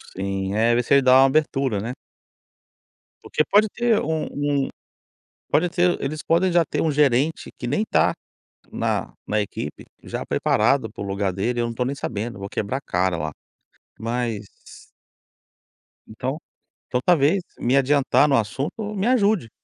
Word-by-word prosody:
Sim, 95 0 -2
é 115 +2 +3
ver 120 - +2
se - - +1
ele 140 - +6
dá 130 0 +6
uma 135 - +7
abertura, 135 -5 +1
né? 115 +5 -4 1.3
Porque 155 - 0
pode 210 +1 +5
ter 235 0 +1
um 160 0 -1
um 145 -1 0 0.8
pode 175 +4 +3
ter 175 0 +1
eles 150 +3 -3
podem 175 +2 +2
já 170 -1 +4
ter - - -3
um 160 - +1
gerente 145 +1 +1
que 120 - -5
nem 145 - 0
tá - - +2 0.6
na - - -2
na 110 - 0
equipe, 105 - -5 0.2
já - - -5
preparado 110 +1 +1
para 105 - -8
o - - -5
lugar 100 -1 -1
dele, 120 +6 -1
eu 120 - +1
não 115 - -5
tô 125 - -1
nem 135 +3 -2
sabendo, 115 -4 -4
vou 100 0 -6
quebrar 110 +7 -2
a - - -13
cara 90 -5 0
lá, 80 -1 -3 0.7
mas 115 -2 -2 1.6
então 130 +6 -4 0.5
então 125 - 0
talvez 175 +2 +3 0.2
me 125 +3 +2
adiantar 140 +1 +3
no 140 - +3
assunto 150 - -2
me 195 0 -1
ajude. 210 - +2
135 Hz, 165 wpm, -23 LUFS, 110-155 Hz, 1.6 s, uma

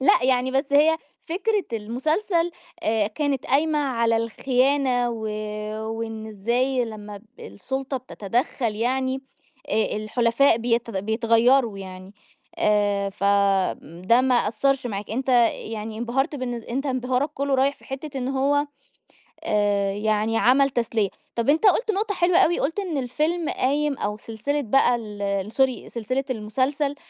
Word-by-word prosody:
لأ، 260 -1 +4
يعني 255 0 +2
بس 275 +2 -1
هي 310 +3 +5 0.3
فكرة 405 +4 -1
المسلسل 310 - 0 0.3
آآ 215 -2 +1
كانت 275 +4 -2
قايمة 300 +2 +2
على 235 -5 +1
الخيانة، 250 +2 +1
و 230 -1 -5 0.7
وإن 225 -1 -5
إزاي 240 +5 0
لمّا 210 -2 -8
ب 215 - -23 0.2
السُلطة 265 - -4
بتتدخّل 240 0 -2
يعني 260 +3 0 0.5
آآ، 220 - 0
الحُلفاء 230 +4 +2
بيت 235 0 0
بيتغيروا 230 +3 +2
يعني، 185 0 -10 0.4
آآ، 205 -1 +2
ف 200 - -14
آمم، 195 -4 +1
ده 230 +6 +4
ما 255 -1 +2
أثّرش 265 +4 0
معاك 205 -2 -5
أنت 260 +4 -3 0.3
يعني 220 0 -6
انبهرت 260 +5 -1
بالن 250 -2 -3
أنت 240 +4 -4
انبهارك 255 +2 0
كلّه 280 0 0
رايح 275 +2 +2
في - - -21
حتة 270 +1 -6
إن 250 - -2
هو 280 +2 +1 0.8
آآ، 205 -2 +1
يعني 215 +2 0
عمل 275 +4 +4
تسلية، 230 -5 0 0.3
طَب 235 +3 0
أنت 315 +8 +3
قُلت 435 +3 +4
نقطة 410 +1 -1
حلوة 355 0 +3
أوي، 345 - +4
قُلت 325 +8 -1
إن 350 -7 -3
الفيلم 305 +6 -1
قايم 285 +1 0
أو 210 +1 -3
سلسلة 230 +7 -3
بقى 245 0 +3
ال 205 -2 -3
sorry 265 0 +1
سلسلة 255 +4 -2
المسلسل 260 +6 -1
245 Hz, 140 wpm, -24 LUFS, 215-275 Hz, 0.8 s, هي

